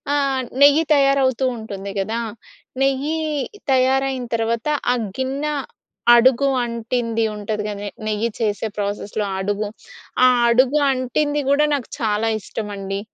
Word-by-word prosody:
ఆహ్, 275 -2 +1 0.2
నెయ్యి 290 +3 +6
తయారవుతూంటుంది 255 -7 0
కదా! 220 +4 -2 0.6
నెయ్యి 275 +4 0 0.5
తయారయిన 265 0 +2
తర్వాత 230 +3 -1 0.3
ఆ - - 0 0.2
గిన్నె 275 +3 -2 0.6
అడుగు 260 +3 +4 0.2
అంటింది 230 0 -2
ఉంటుంది. 210 0 -3
కాని 205 0 -5 0.2
నెయ్యి 215 +2 0
చేసే 215 -1 -1
ప్రాసెస్‌లో 205 +1 -2
అడుగు. 205 +2 -1 0.6
ఆ - - +8 0.2
అడుగు 255 +5 +4
అంటింది 280 +3 0
కూడా 295 +2 +4
నాకు 270 -4 -5
చాలా 220 0 0
ఇష్టమండి. 200 -2 -5
235 Hz, 110 wpm, -21 LUFS, 210-270 Hz, 0.6 s, ఆ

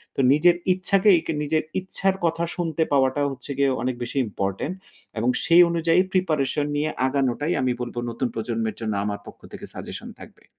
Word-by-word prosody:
তো - - -5
নিজের 170 +4 +5 0.2
ইচ্ছাকেই 185 0 +4
কে - - -1
নিজের 155 +2 0 0.2
ইচ্ছার 190 +1 -1
কথা 165 0 0
শুনতে 165 -2 0
পাওয়াটা 135 +1 +2
হচ্ছে 130 +1 -8
গিয়ে 140 -1 +3
অনেক 125 0 -1
বেশি 120 - -5
ইম্পোর্টেন্ট। 100 - -3 0.5
এবং 120 +3 +1
সেই 170 +1 +6
অনুযায়ী 170 +1 +2
প্রিপারেশন 150 -5 +1
নিয়ে 150 +1 0 0.2
আগানোটাই 140 +4 0
আমি 130 -1 +1
বলব, 120 0 -5
নতুন 120 +2 -2
প্রজন্মের 115 -1 -2
জন্য 110 -2 -2
আমার 105 -1 -3
পক্ষ - - -12
থেকে - - -8
সাজেশন - - -8
থাকবে। - - -14
145 Hz, 170 wpm, -24 LUFS, 125-170 Hz, 0.5 s, সেই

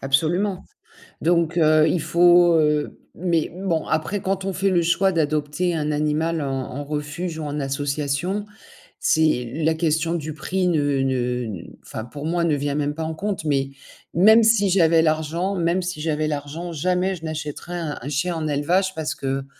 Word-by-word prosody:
absolument 175 +8 0 0.6
donc 170 0 +1
heu, 155 -1 +5
il 160 +1 +1
faut, 175 +1 +5
heu 150 -1 0 0.2
mais 170 -2 0
bon, 180 -4 -1
après 160 +6 -1
quand 190 0 -2
on 195 - -2
fait 195 +2 +1
le 180 -2 +3
choix 175 +3 +2
d'adopter 155 +2 0
un 150 -2 -1
animal 155 +2 0
en - - -2 0.3
en 145 - -4
refuge 150 +4 -4
ou - - -4
en 150 0 -3
association, 145 +7 -2 0.5
c'est 155 -7 +2
la 160 +1 +2
question 160 0 0
du 155 -2 -4
prix 180 +4 -1
ne 145 -5 +1
ne 125 -6 -2 0.2
enfin 110 - -6
pour 145 +4 -8
moi, 170 +1 0
ne 160 -3 +2
vient 145 0 -2
même 145 0 -1
pas 160 +2 -5
en 160 0 -4
compte 195 -1 -3
mais 135 -2 +1 0.4
même 220 +6 +6
si 215 -3 +4
j'avais 165 -3 +4
l'argent 160 +4 0
même 175 +1 +1
si 175 -4 -4
j'avais 155 -1 -1
l'argent, 155 +4 -4
jamais 180 +4 0
je 165 - -13
n'achèterais 155 +2 -5
un 155 -3 -4
un 135 - -5
chien 160 +5 -1
en 160 -1 -3
élevage 180 +7 +1
parce 160 -1 -3
que, 135 0 -3
160 Hz, 180 wpm, -22 LUFS, 145-175 Hz, 0.6 s, même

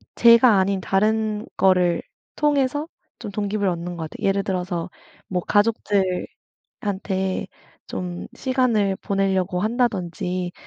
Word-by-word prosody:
제가 235 -2 +7
아닌 190 0 +1
다른 215 +2 +1
거를 180 -2 +3 0.3
통해서 290 0 +1 0.3
좀 - - -6
동기부여를 205 -1 -1
얻는 175 +1 -5
것 160 -2 -5
같아요. - - -6
예를 195 0 +1
들어서 180 -2 -2 0.4
뭐 180 - -1
가족들한테 205 -3 0 1.4
좀 175 -1 -5
시간을 245 -8 +1
보낼려고 190 -2 0
한다든지 185 -6 -1
195 Hz, 260 characters per minute, -23 LUFS, 180-220 Hz, 1.4 s, 제가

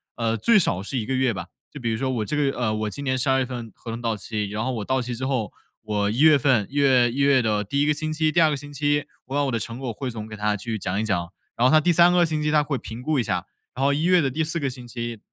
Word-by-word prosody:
呃， 115 -1 0
最 230 - +4
少 95 - +2
是 130 +6 -4
1 110 - -2
个 135 - -2
月 130 -2 +2
吧， - - -6 0.2
就 145 - -9
比 115 -2 -2
如 110 - -1
说 130 +1 -1
我 115 -5 -1
这 150 - -2
个 145 - +2
月 135 - +2
呃， 110 -3 -1
我 110 0 -2
今 140 +7 -6
年 130 -1 0
12 130 +1 +2
月 130 - 0
份 120 -4 -7
合 115 - -8
同 115 +1 -5
到 115 -2 -1
期， 105 0 -3
然 105 +2 -3
后 130 - -1
我 110 -4 -4
到 130 0 0
期 125 0 -4
之 130 +3 -4
后， 125 -7 -1 0.3
我 105 -1 -1
1 115 +5 -2
月 155 -2 +7
份 125 -6 +2
1 140 - -13
月 130 -4 +4
1 130 - -7
月 140 -2 +4
的 105 -2 0
第 140 +7 -1
1 - - +3
个 150 - +3
星 155 +1 -3
期、 155 0 +1
第 170 - +2
2 160 -2 +5
个 150 - 0
星 145 +1 -9
期， 145 +1 0 0.2
我 135 +2 -6
把 145 - +2
我 135 - -1
的 115 - -1
成 115 +3 -5
果 130 -3 -4
汇 130 +4 -5
总 110 -2 -6
给 110 -1 -9
他 105 0 0
去 110 +1 -4
讲 95 +3 -2
一 - - -1
讲， 90 -4 -2 0.2
然 125 +2 +4
后 - - +3
他 155 0 +6
第 175 - +3
3 175 +1 +5
个 175 -1 +4
星 155 -2 -2
期 150 - 0
他 150 -1 +4
会 145 -3 -2
评 115 +1 -8
估 150 0 0
一 - - +1
下， - - -2 0.3
然 135 - -3
后 140 - +4
1 150 - -1
月 180 -2 +5
的 135 -3 0
第 160 +4 -2
4 160 +2 0
个 140 -4 -1
星 125 -1 -9
期 120 -2 -5
130 Hz, 315 characters per minute, -24 LUFS, 110-145 Hz, 0.3 s, 月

